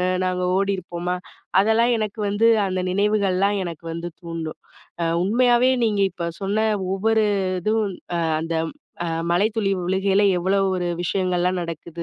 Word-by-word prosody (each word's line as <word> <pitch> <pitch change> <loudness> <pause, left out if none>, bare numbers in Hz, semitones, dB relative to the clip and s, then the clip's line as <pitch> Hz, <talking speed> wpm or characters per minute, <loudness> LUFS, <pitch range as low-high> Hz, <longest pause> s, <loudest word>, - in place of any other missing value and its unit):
அ - - +1 0.2
நாங்க 180 0 -1
ஓடியிருப்போமா! 180 -2 -2 0.4
அதெல்லாம் 225 +4 +3
எனக்கு 215 0 -3
வந்து, 205 +3 +3 0.2
அந்த 185 0 -1
நினைவுகள்லாம் 200 0 +1
எனக்கு 170 -1 -7
வந்து 170 +1 -5
தூண்டும். 165 -2 -6 0.4
அ - - +2 0.2
உண்மையாவே 245 +4 +4
நீங்க 210 -3 +1
இப்ப 170 -1 -3
சொன்ன 210 +3 +1 0.3
ஒவ்வொரு 220 +2 +2 0.4
இதுவும் 215 -1 0 0.2
"அ - - +1 0.2
அந்த 165 +1 -3 0.5
அ - - -2 0.2
மழை 175 +4 +3
துளி 205 -3 +1
விழுகையில, 190 +2 +2 0.2
எவ்வளவு 195 +2 +1
ஒரு 175 -1 -1
விஷயங்கள்லாம் 180 0 0
நடக்குது. 170 0 -6
195 Hz, 140 wpm, -22 LUFS, 175-210 Hz, 0.5 s, உண்மையாவே